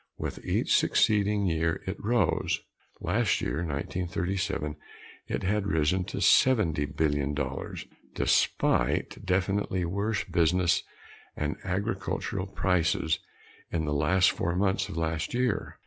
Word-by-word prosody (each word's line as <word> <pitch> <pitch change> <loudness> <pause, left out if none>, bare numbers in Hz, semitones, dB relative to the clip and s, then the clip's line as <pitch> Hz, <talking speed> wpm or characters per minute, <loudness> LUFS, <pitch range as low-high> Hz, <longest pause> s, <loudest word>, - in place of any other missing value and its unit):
With - - -5
each - - +1
succeeding 105 -1 +3
year 80 -2 0
it 95 +2 -5
rose. 115 -1 +1 0.4
Last - - +1
year, - - -2
1937, 85 0 -2 0.5
it - - -3
had 100 +1 0
risen 90 +1 +1
to 100 - -5
seventy 100 - +4
billion 75 -1 0
dollars 70 -2 -4 0.3
despite - - +1
definitely 95 -1 0
worse 100 +3 -1
business 85 0 +2 0.6
and 75 0 -1
agricultural 95 0 -2
prices 85 -4 +1 0.5
in 80 -2 -1
the 75 - -1
last 90 +6 +3
four 85 +1 -2
months 95 +1 +1
of 100 - -6
last 80 +3 -2
year. 125 -3 -1
90 Hz, 115 wpm, -28 LUFS, 80-100 Hz, 0.6 s, seventy